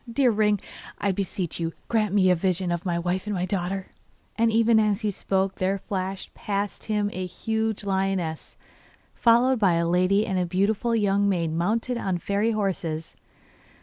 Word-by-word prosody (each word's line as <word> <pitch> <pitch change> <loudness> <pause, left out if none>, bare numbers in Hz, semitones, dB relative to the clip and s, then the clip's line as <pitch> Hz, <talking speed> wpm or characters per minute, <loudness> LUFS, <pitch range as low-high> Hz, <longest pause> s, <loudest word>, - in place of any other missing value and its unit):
Dear 250 +1 +3
ring, 210 -1 +2 0.4
I 200 - 0
beseech 185 -3 -3
you, 165 -1 -2
grant 215 -3 +1
me 190 -2 +4
a - - +4
vision 180 0 0
of 175 +2 -2
my 170 -1 0
wife 180 +3 -2
and 210 - -1
my 180 0 -1
daughter!' 185 0 -3 0.4
And 230 0 +2
even 225 0 +4
as 210 0 +1
he 210 -2 0
spoke 190 0 -1
there 190 +1 +1
flashed 190 0 -4
past 200 0 -3
him 210 -1 0
a 185 - -3
huge 220 +3 -2
lioness, 190 -5 -2 0.6
followed 240 +2 +4
by 195 -5 +4
a 170 0 +1
lady 185 +4 +3
and 190 -2 -1
a 180 - +1
beautiful 205 +6 +1
young 200 -2 +2
maid 170 -4 0
mounted 225 +9 0
on 190 -5 -1
fairy 200 +5 0
horses. 180 -7 -2
195 Hz, 175 wpm, -25 LUFS, 180-215 Hz, 0.6 s, me